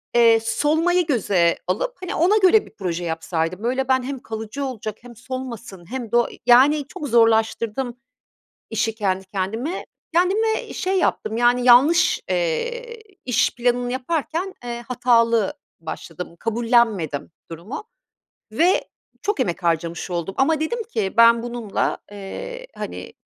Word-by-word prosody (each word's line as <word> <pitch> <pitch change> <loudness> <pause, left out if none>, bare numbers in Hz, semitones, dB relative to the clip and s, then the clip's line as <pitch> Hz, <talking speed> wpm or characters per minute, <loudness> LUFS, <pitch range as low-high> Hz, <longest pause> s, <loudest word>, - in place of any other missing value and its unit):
eee, 230 -1 +6
solmayı 315 +10 +1
göze 190 - +2
alıp, 215 - -1
hani, 365 - -4
ona 370 +6 +4
göre 415 +1 +5
bir - - -16
proje 180 -3 -3
yapsaydım. 165 +2 -2
Böyle 260 +2 0
ben, 260 -1 +2
hem 270 +1 -4
kalıcı 220 +5 -5
olacak, 220 -5 -5
hem 240 0 -13
solmasın 235 -7 -8
hem 250 -4 -5
de - - 0
o 240 - +2
eee, - - -13
yani, 270 +5 +5
çok 295 - -6
zorlaştırdım 230 +1 +2 0.7
işi 225 -1 0
kendi 190 -3 -1
kendime. 215 - -3 0.3
Kendime 410 +6 +1
şey 380 +1 0
yaptım, 220 -10 0
yani 240 +1 +3
yanlış, 285 - +5
eee, 485 -1 -2 0.2
iş 250 -1 +1
planını 245 0 0
yaparken, 325 +7 -2
eee, 240 0 -5
hatalı 235 0 +3 0.3
başladım. 165 +1 -7
Kabullenmedim 225 - +1 0.2
durumu 175 - -7 0.7
ve 340 - +3 0.4
çok 415 +1 -1
emek 175 +1 -1
harcamış 170 +1 -1
oldum 175 +2 -3
ama 305 +3 +2
dedim 460 +10 -1
ki 315 - -3
"Ben 230 0 +6
bununla 240 -3 -2
eee, - - -7
hani, - - -6
240 Hz, 135 wpm, -22 LUFS, 210-305 Hz, 0.7 s, eee